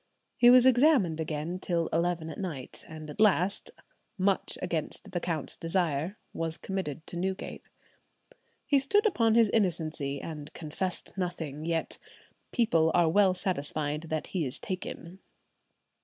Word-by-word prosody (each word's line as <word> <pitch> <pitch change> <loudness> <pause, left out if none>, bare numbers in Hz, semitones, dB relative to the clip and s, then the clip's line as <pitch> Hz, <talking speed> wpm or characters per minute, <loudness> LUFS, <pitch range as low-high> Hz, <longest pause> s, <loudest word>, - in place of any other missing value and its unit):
He 240 - +6
was 250 0 +8
examined 250 - +4
again 160 +3 -3
till 170 -3 0
eleven 165 -1 0
at - - -8
night, 160 -10 -5
and 155 -1 -9
at - - -12
last, 200 -2 +3 0.5
"much 190 0 +1
against 175 +3 -3
the 175 - -1
count's 165 -4 -2
desire," 165 +1 -1 0.2
was 165 0 -3
committed 175 -5 -4
to 175 - -6
Newgate. 190 +2 -4 1.0
He 280 - +4
stood 410 - +3
upon 230 - +3
his 230 -2 +5
innocency, 160 -9 0
and 150 -2 -7
confessed 170 +3 -4
nothing, 160 -5 -3
yet 165 -1 -1 0.5
"people 165 -10 +3
are 170 -2 +5
well 190 +1 +4
satisfied 155 -3 -2
that 155 -1 -1
he 180 -4 +1
is 130 -2 -4
taken." 185 -1 -6
175 Hz, 140 wpm, -29 LUFS, 160-195 Hz, 1.0 s, was